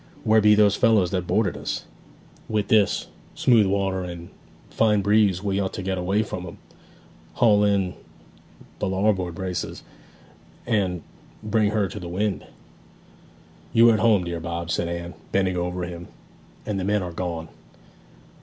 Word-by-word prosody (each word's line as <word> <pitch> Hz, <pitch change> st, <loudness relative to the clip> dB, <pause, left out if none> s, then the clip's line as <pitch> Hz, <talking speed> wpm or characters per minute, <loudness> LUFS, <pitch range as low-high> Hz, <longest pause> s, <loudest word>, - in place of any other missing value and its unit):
'Where 110 Hz, 0 st, +4 dB
be 105 Hz, 0 st, +6 dB
those 105 Hz, -2 st, +4 dB
fellows 110 Hz, -7 st, +3 dB
that 90 Hz, -2 st, -2 dB
boarded 105 Hz, -4 st, +1 dB
us? -, -, -4 dB, 0.6 s
With 105 Hz, -2 st, -1 dB
this 105 Hz, -3 st, +3 dB, 0.3 s
smooth 115 Hz, -5 st, +4 dB
water 95 Hz, -1 st, 0 dB
and 85 Hz, -1 st, -8 dB, 0.4 s
fine 105 Hz, -3 st, +2 dB
breeze 100 Hz, -2 st, +3 dB
we 100 Hz, -1 st, 0 dB
ought 95 Hz, -1 st, -2 dB
to 95 Hz, -, -5 dB
get 95 Hz, 0 st, -2 dB
away 95 Hz, +4 st, +1 dB
from 90 Hz, -4 st, -6 dB
'em. 85 Hz, -, -10 dB, 0.8 s
Haul 105 Hz, -3 st, +4 dB
in 100 Hz, -3 st, +1 dB, 0.9 s
the 105 Hz, -, -1 dB
larboard 95 Hz, -3 st, 0 dB
braces, 90 Hz, 0 st, -4 dB, 0.8 s
and 95 Hz, -7 st, 0 dB, 0.4 s
bring 110 Hz, -1 st, +1 dB
her 105 Hz, -2 st, 0 dB
to 105 Hz, -, -8 dB
the 90 Hz, -2 st, -7 dB
wind.' 100 Hz, +3 st, -2 dB, 1.3 s
'You 115 Hz, +1 st, +7 dB
are -, -, +4 dB
at 110 Hz, -, +1 dB
home, 105 Hz, -5 st, +4 dB
dear 85 Hz, -1 st, -4 dB
Bob,' 85 Hz, +1 st, -4 dB
said 85 Hz, -, 0 dB
Anne, 85 Hz, +1 st, -5 dB, 0.2 s
bending 95 Hz, -2 st, +1 dB
over 90 Hz, 0 st, -2 dB
him, 85 Hz, -1 st, -7 dB, 0.6 s
'and 105 Hz, -2 st, -2 dB
the -, -, -2 dB
men 100 Hz, +1 st, +1 dB
are 90 Hz, -1 st, -6 dB
gone.' 85 Hz, -2 st, -4 dB
95 Hz, 155 wpm, -24 LUFS, 90-105 Hz, 1.3 s, You